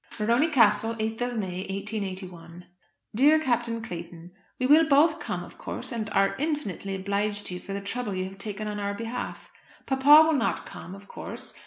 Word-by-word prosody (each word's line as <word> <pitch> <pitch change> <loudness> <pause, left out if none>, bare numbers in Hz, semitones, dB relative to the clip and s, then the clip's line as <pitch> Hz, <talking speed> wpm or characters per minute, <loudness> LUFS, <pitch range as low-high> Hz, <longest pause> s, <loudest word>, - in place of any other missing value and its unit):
Morony 235 +7 +3
Castle, 225 -4 +3
8th 220 +1 -3
of 245 -1 -1
May, 185 -4 -3
1881. 185 -4 -6 0.5
DEAR 285 +8 +5
CAPTAIN 240 -5 -1
CLAYTON, 170 -4 -8 0.3
We 255 - +1
will 305 +4 +6
both 310 +3 +5
come, - - -4
of - - -14
course, - - -6
and 220 -3 -3
are 195 -1 +2
infinitely 275 - -2
obliged 205 +2 -2
to - - -3
you 180 - -5
for 195 - -7
the 200 - -3
trouble 205 0 -3
you 185 - -1
have 195 +1 -9
taken 210 +1 -4
on 210 0 -4
our 200 0 -2
behalf. 230 +3 -6 0.3
Papa 285 +4 +7
will 320 - +2
not 235 -5 0
come, 185 - -9
of 200 +1 -14
course. - - -8
215 Hz, 185 wpm, -27 LUFS, 195-250 Hz, 0.5 s, Papa